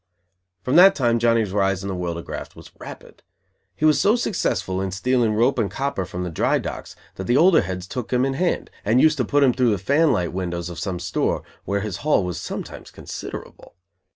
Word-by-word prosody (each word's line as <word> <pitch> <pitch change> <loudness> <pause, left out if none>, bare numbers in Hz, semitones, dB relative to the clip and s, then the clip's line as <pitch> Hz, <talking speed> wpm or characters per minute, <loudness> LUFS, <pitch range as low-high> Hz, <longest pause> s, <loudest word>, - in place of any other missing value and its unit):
From 130 - +2
that 190 +2 +8
time 120 -4 +1
Johnny's 115 -3 +2
rise 95 -1 0
in - - -4
the 95 - -3
world 90 -2 -3
of 85 - -8
graft - - -7
was - - -14
rapid. - - -11 0.5
He 130 - -1
was 155 -1 +4
so 210 +3 +4
successful 95 - -1
in 95 - -2
stealing 115 +3 +1
rope 120 +4 +2
and 105 -4 0
copper 135 -3 -3
from 90 -1 -5
the 90 - -4
dry - - +1
docks - - -6 0.2
that 95 - -5
the 120 +5 +2
older 175 +2 +5
heads 90 0 -5
took 120 +4 -6
him 125 +1 +2
in 135 - -1
hand 175 +6 -1
and 110 +5 +3
used 155 +2 +4
to 125 - 0
put 145 +5 +2
him 130 -3 +4
through 125 -1 +2
the 105 - +1
"fan 140 - +2
light" 85 -1 -1
windows 85 -2 -4
of 85 - -8
some 95 -3 -3
store, 85 - -1 0.2
where 100 +1 -1
his 105 -3 -4
haul 150 -9 +1
was 90 -1 -4
sometimes - - -7
considerable. - - -9
110 Hz, 220 wpm, -22 LUFS, 95-135 Hz, 0.5 s, that